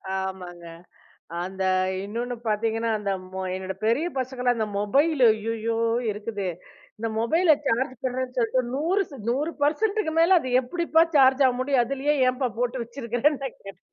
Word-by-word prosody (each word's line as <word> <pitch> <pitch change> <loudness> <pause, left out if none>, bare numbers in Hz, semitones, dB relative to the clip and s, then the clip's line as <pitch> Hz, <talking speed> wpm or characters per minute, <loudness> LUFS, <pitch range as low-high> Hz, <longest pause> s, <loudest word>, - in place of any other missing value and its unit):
ஆமாங்க, 185 -2 -5 0.8
அந்த 190 +1 -4 0.4
இன்னொன்னு 240 +4 -4
பார்த்தீங்கன்னா, 225 +2 0
அந்த 200 -1 -2 0.2
மொ 190 - -4
என்னோட 190 0 -4
பெரிய 265 +10 +2
பசங்கலாம், 250 -1 0
அந்த 220 -1 -1
மொபைலு 270 +6 +3
ஐயயோ 225 +1 -2 0.3
இருக்குதே! 205 -2 -4 0.5
இந்த 225 0 -2
மொபைல 320 +8 +3
சார்ஜ் 255 +1 0
பண்ணுறேன்னு 255 0 -3
சொல்ட்டு 240 +2 +2
100 350 +8 +1 0.3
100% 315 - 0
மேல 355 +2 +6
அது 255 - -5
எப்டிப்பா 325 +4 +1
சார்ஜ் 265 0 +6
ஆக 250 - +1
முடியும். 260 -2 +2
அதுலேயே 275 +3 0
ஏன்பா 255 0 -1
போட்டு 245 0 -1
வச்சிருக்கிறேன்னு 245 +4 -1
நான் 265 - -5
கேட்டேன். 195 - -10
245 Hz, 140 wpm, -25 LUFS, 220-285 Hz, 0.8 s, மேல